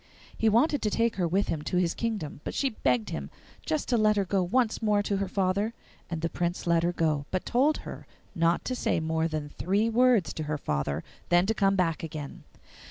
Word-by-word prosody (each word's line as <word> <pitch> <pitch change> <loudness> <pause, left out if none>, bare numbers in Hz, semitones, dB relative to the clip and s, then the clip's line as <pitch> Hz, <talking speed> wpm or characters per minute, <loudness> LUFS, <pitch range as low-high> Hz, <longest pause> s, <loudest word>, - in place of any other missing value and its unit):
He 225 - +2
wanted 275 +7 +3
to 215 - +1
take 230 +1 0
her 180 -2 +1
with 195 +4 0
him 155 - -1
to 180 - -2
his 175 -2 +2
kingdom, 205 -11 -3
but - - -5
she 275 -2 +1
begged 125 - 0
him 70 -1 -4 0.4
just 155 - -1
to 245 - +3
let 215 -1 +4
her 200 -1 +1
go 190 +1 +1
once 220 +6 +1
more 210 -2 +2
to 200 -1 -1
her 195 0 -1
father; 200 +4 0 0.3
and 165 -2 -3
the - - +2
Prince 175 +1 -2
let 170 -1 +3
her 170 +1 +1
go, 155 -4 0
but 185 - -2
told 275 +5 +2
her - - -8 0.3
not 170 0 +1
to 255 - -1
say 245 - 0
more 160 0 0
than 155 -2 -4
three 205 +8 0
words 240 -5 +3
to 155 - -4
her 150 0 -2
father, 70 - -2 0.3
then 175 +1 +4
to 220 - +1
come 195 -2 +2
back 170 -4 +1
again. 155 -3 -7
185 Hz, 225 wpm, -28 LUFS, 160-215 Hz, 0.4 s, let